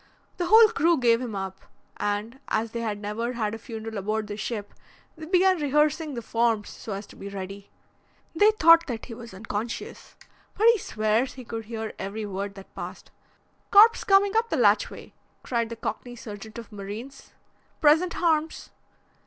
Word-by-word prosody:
The 350 -1 -1
whole 440 +2 +8
crew 340 -7 +2
gave 235 -2 +3
him 235 -5 -5
up, 190 0 -5 0.4
and, 210 +5 -3
as 220 +1 -1
they 235 - -4
had 220 -3 -2
never 210 +4 -3
had 220 -3 -2
a 225 - -6
funeral 220 -1 -6
aboard 215 +2 -2
the 205 0 -6
ship, 210 -1 -5 0.4
they 315 0 -9
began 370 -1 +3
rehearsing 300 +1 +1
the 235 - -5
forms 225 -2 0
so 215 - -7
as 200 +1 -5
to - - -16
be 200 - -8
ready. 195 0 -7 0.7
They 410 +6 +6
thought 335 -5 +6
that 235 -4 -5
he 240 - -9
was 230 0 -10
unconscious, 210 +3 -6 0.4
but 435 - +2
he 465 -2 +4
swears 220 0 0
he 255 -2 -10
could 225 -1 -6
hear 220 0 -5
every 205 +3 -4
word 195 0 -5
that 195 -1 -13
passed. - - -8 0.6
'Corpse 445 +3 +7
comin' 395 0 +4
up 460 +1 +2
the - - 0
latchway!' - - +1 0.3
cried 235 -2 -1
the 230 - -5
Cockney 245 +2 -5
sergeant 215 -1 -9
of 230 -2 -9
Marines. 210 +7 -8 0.5
'Present 320 +3 +4
harms!' 320 -2 0
230 Hz, 175 wpm, -26 LUFS, 210-310 Hz, 0.7 s, whole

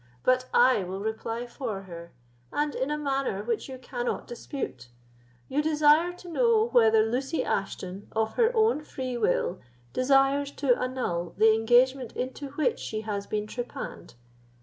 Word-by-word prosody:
But 255 0 +3
I 250 -4 +5
will 185 +2 -5
reply 225 +2 -3
for 235 -5 -5
her, 170 -2 -10 0.4
and 295 0 0
in 265 - -2
a 300 - -1
manner 275 -8 -1
which 230 +3 -2
you 260 - -6
cannot 245 -1 -4
dispute. 235 - -6 0.6
You 285 +3 0
desire 310 +2 +4
to 355 0 -13
know 455 +5 +3
whether 220 - +5
Lucy 265 +7 -1
Ashton, 195 0 -3
of 220 0 0
her 465 -1 +3
own 440 -7 +3
free 255 -4 -5
will, 190 -4 0 0.3
desires 270 +2 +3
to 265 -4 +2
annul 240 -11 -3
the 220 +1 +6
engagement 245 +3 +3
into 260 +3 -4
which 295 -1 0
she 215 -1 -4
has 205 -2 -4
been 210 -1 -2
trepanned. 240 - -7
250 Hz, 150 wpm, -27 LUFS, 220-280 Hz, 0.6 s, the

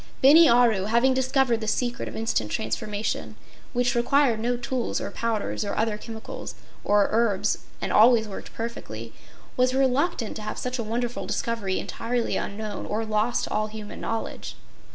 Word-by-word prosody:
Bini 310 +4 +8
Aru, 235 -5 +4
having 235 +5 +3
discovered 260 -2 +2
the 220 - -4
secret 240 +2 -1
of - - -10
instant 220 - -1
transformation, 205 - -3 0.4
which 245 +2 +1
required 240 -1 +3
no 240 +2 0
tools 245 0 -2
or - - -5
powders 225 -2 -2
or 200 - -3
other 220 -1 +1
chemicals 220 +1 -8 0.3
or 205 -1 +4
herbs 210 -3 +1 0.2
and - - -2
always 225 0 +6
worked 200 - -8
perfectly, 115 - -6 0.4
was 255 +1 +2
reluctant 270 -1 +1
to - - -7
have 215 - -5
such 250 0 -3
a - - -1
wonderful 235 +2 -3
discovery 220 -5 -1
entirely 240 0 -2
unknown 210 +1 -4
or 220 +2 -1
lost 215 +2 +1
to - - -4
all 215 0 0
human 215 -1 -8
knowledge. 225 0 -4
230 Hz, 160 wpm, -25 LUFS, 210-245 Hz, 0.4 s, Bini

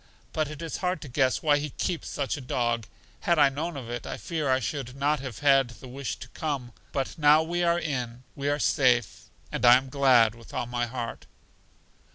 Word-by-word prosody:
But 155 -2 0
it 155 +1 -7
is 165 - -4
hard 180 -2 -1
to - - -8
guess 130 0 +1
why 145 -2 +4
He 150 +1 -3
keeps 170 +4 -3
such 140 -2 -2
a 145 - -7
dog. 120 -3 -1 0.3
Had 170 - +2
I 145 - +6
known 155 +3 -4
of 125 -4 -7
it, 120 0 -5
I - - -4
fear 155 -5 -2
I 130 0 +3
should 130 -2 -4
not 145 +2 +1
have 130 -5 -6
had 135 -3 +5
the 130 - -10
wish 135 +1 -4
to - - -10
come. 140 -6 -3 0.2
But 135 +4 -3
now 150 +1 +6
we 175 +2 -2
are 170 0 +3
in, 125 -7 -3
we 140 +1 -2
are 145 - +1
safe; 125 -5 +2 0.3
and - - -3
I 120 0 +9
am 130 0 -5
glad 125 -5 +5
with 115 -1 -13
all - - -1
my 120 0 -2
heart. 120 -1 -6
135 Hz, 215 wpm, -27 LUFS, 125-150 Hz, 0.3 s, I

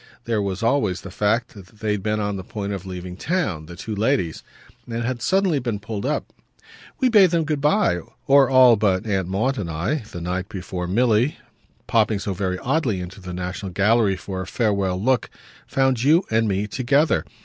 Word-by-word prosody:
There 115 -3 0
was 100 +1 -3
always 115 -7 +1
the 95 - -9
fact 105 +4 0
that 100 -3 -12
they 110 0 -1
had 105 -2 -1
been 105 +1 -1
on 105 -1 -1
the 95 - -5
point 100 0 -4
of 95 -1 -6
leaving 90 -1 -6
town, 100 - -2
the 85 - -9
two 110 +5 -6
ladies, 105 - 0 0.5
and 115 0 -3
had 120 0 -2
suddenly 190 - +2
been 120 -4 -2
pulled 105 +3 -4
up. 150 - -2 0.7
"We 260 - +3
bade 210 -6 +6
them 165 -1 +1
good 150 -2 -2
bye 150 - +2 0.3
or 135 -1 +5
all 130 -3 +7
but 100 -1 +1
Aunt 95 -4 -1
Maud 110 +8 0
and 90 -5 -4
I, 85 - -1
the 85 - -6
night 90 +3 -3
before 90 -3 -5
Milly, 115 - +2 0.5
popping 110 -2 +2
so 100 0 -3
very 95 -1 -2
oddly 125 - 0
into 90 +3 -8
the 90 -1 -7
National 90 +2 -5
Gallery 100 +1 +3
for 95 0 -5
a 95 - -6
farewell 100 -5 0
look, 125 +4 +1 0.4
found 135 -3 +1
you 160 +7 +5
and 110 0 +2
me 100 0 0
together. 135 +8 +1
105 Hz, 195 wpm, -22 LUFS, 95-130 Hz, 0.7 s, all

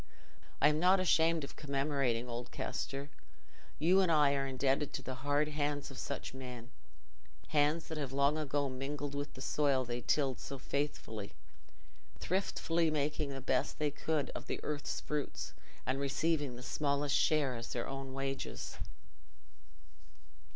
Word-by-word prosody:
I 150 - +7
am 150 0 +1
not 185 +3 +6
ashamed 165 -3 +4
of 140 - -7
commemorating 135 -4 0
old 120 0 -4
Kester. 140 +1 -3 0.7
You 180 +5 +5
and 180 -3 +3
I 150 -3 +5
are 135 -1 0
indebted 135 +2 +1
to 135 - -3
the 130 - -4
hard 145 +2 +2
hands 145 -1 -1
of 130 - -8
such 140 - -4
men—hands 130 +4 -3
that 160 -1 -4
have 140 -3 -2
long 140 +2 +3
ago 145 -2 0
mingled 140 +2 -3
with 145 0 -4
the 130 - -6
soil 140 -3 +2
they 120 0 -3
tilled 135 0 +2
so 135 - -5
faithfully, 130 -7 -3 0.8
thriftily 170 -3 +1
making 150 0 0
the 135 -1 -5
best 130 0 +1
they 150 -1 +1
could 150 -1 -1
of - - -7
the - - -2
earth's 150 -1 -2
fruits, 150 -2 -3 0.3
and 130 +1 0
receiving 145 -1 +1
the 125 - -9
smallest 140 0 +1
share 145 -5 +3
as 115 0 -6
their 120 - -2
own 135 0 -5
wages. 135 0 -3
140 Hz, 150 wpm, -35 LUFS, 135-150 Hz, 0.8 s, I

